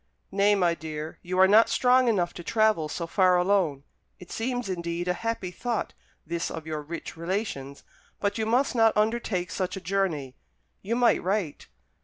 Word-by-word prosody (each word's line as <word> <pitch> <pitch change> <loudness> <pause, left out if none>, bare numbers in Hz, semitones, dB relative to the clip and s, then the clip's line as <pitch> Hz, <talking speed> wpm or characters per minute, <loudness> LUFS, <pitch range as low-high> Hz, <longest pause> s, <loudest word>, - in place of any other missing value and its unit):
"Nay, 200 +1 +3
my 175 -4 +2
dear, 155 -1 -7
you 185 +1 -4
are 190 0 +7
not 215 +3 +6
strong 255 0 +4
enough 185 -7 +1
to 175 - -9
travel 215 -7 +2
so 170 - -4
far 180 +1 +3
alone. 180 -7 +1 0.3
It 180 - -13
seems, 245 0 -2
indeed, 170 -1 -3
a 180 - +2
happy 225 -3 -3
thought 235 +4 -3 0.3
this 170 +1 -3
of 160 -1 -7
your 155 -1 -4
rich 165 +3 -7
relations; 170 -6 -4 0.4
but 205 +2 -1
you 220 - -1
must 255 +5 +2
not 225 -3 +3
undertake 210 -5 0
such 185 0 -3
a - - -4
journey. 175 -8 -2 0.5
You 220 +4 -2
might 245 -1 +3
write." 185 -5 -2
185 Hz, 175 wpm, -27 LUFS, 170-220 Hz, 0.5 s, are